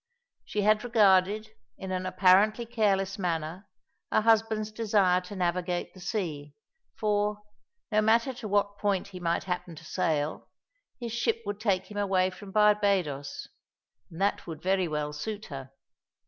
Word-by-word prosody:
She 210 - -2
had 215 +1 +3
regarded, 215 -2 +3 0.3
in 190 -1 -6
an 185 0 -2
apparently 200 +5 +4
careless 200 -4 0
manner, 170 +1 -3 0.4
her - - +3
husband's 220 -1 +2
desire 205 -5 +2
to 180 +3 -9
navigate 180 -1 -1
the 185 - -14
sea; 170 -9 -4 0.4
for, 210 0 0 0.5
no 215 0 +4
matter 230 +4 +3
to 245 -3 -7
what 205 0 0
point 200 -2 0
he 185 -2 -9
might 170 -1 0
happen 180 -2 -4
to - - -12
sail, 155 -2 -1 0.5
his 235 -2 -5
ship 230 -1 0
would 205 0 -4
take 195 -3 0
him 205 - -4
away 190 -2 +2
from 195 +2 -11
Barbadoes, 200 -9 +1 0.6
and 165 - -11
that 200 -1 0
would 160 -2 -7
very 190 -1 +2
well 150 -1 -3
suit 210 +8 -5
her. 135 -1 -7
195 Hz, 150 wpm, -28 LUFS, 180-215 Hz, 0.6 s, apparently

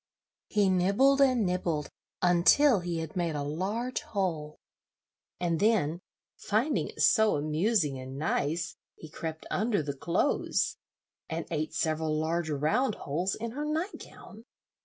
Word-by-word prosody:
He 205 -2 +2
nibbled 200 +10 +3
and 255 -5 +4
nibbled 175 -5 -1 0.3
until 185 +9 +5
he 175 -1 -3
had 160 -1 -7
made 170 -3 -1
a 145 - -2
large 200 - -2
hole; 165 -7 -3 0.8
and 170 -2 0
then, 185 -7 +2 0.4
finding 225 +9 0
it - - -3
so 220 -3 +5
amusing 155 - +1
and 130 +1 -8
nice, 160 +2 -1 0.2
he 160 - -11
crept 160 +1 -6
under 215 -6 +1
the 140 -1 -4
clothes, 170 - 0 0.5
and 165 0 -3
ate 155 0 -2
several 155 -1 0
large 160 +1 -1
round 155 - +1
holes 175 +7 -2
in 230 +1 -5
her 290 +5 -4
night 315 +6 -2
gown. 220 +2 -14
175 Hz, 135 wpm, -29 LUFS, 155-220 Hz, 0.8 s, until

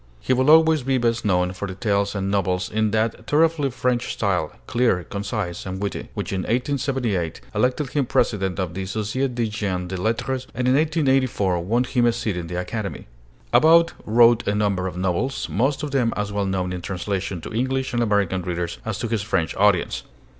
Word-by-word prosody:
He 130 - 0
will 130 +3 +2
always 160 -1 +6
be 130 +1 +1
best 115 -1 0
known 90 -2 +2
for 100 +2 -5
the 95 - -6
tales 100 0 0
and 100 0 -1
novels 90 -2 0
in 110 0 +1
that 110 +1 -1
thoroughly 155 -1 +2
French 125 -1 -1
style 95 -6 0
clear, 120 -7 +1
concise, 100 -1 -4
and 95 0 -5
witty 100 0 -4
which - - -3
in 95 - -1
1878 125 - -1
elected 130 +2 0
him 140 -4 0
president 95 -6 0
of 90 -3 -2
the 95 +1 -4
Société 110 +6 -2
des 120 -1 0
Gens 100 -4 -3
de 95 - -3
Lettres, 120 +6 -1
and 125 0 0
in 130 - +4
1884 135 - +2
won 115 +8 +1
him 120 -1 +1
a - - +4
seat 115 -4 -2
in 85 -2 -4
the 90 +1 -3
Academy. 100 +2 -4 0.5
About 165 +2 +6
wrote 115 +1 +4
a 100 - +1
number 100 -3 0
of 90 -1 -6
novels, 95 +9 -1
most 135 +7 0
of 150 - -3
them 125 -4 +1
as 105 0 -2
well 100 -1 -1
known 90 -1 -1
in 90 - -5
translation 95 0 -3
to - - -8
English 130 +3 -1
and 120 - +1
American 100 -4 +1
readers 85 -1 -3
as 110 -2 -3
to 115 - -3
his 110 -2 -1
French 95 -6 -1
audience. 100 -3 +2
105 Hz, 195 wpm, -23 LUFS, 95-125 Hz, 0.5 s, always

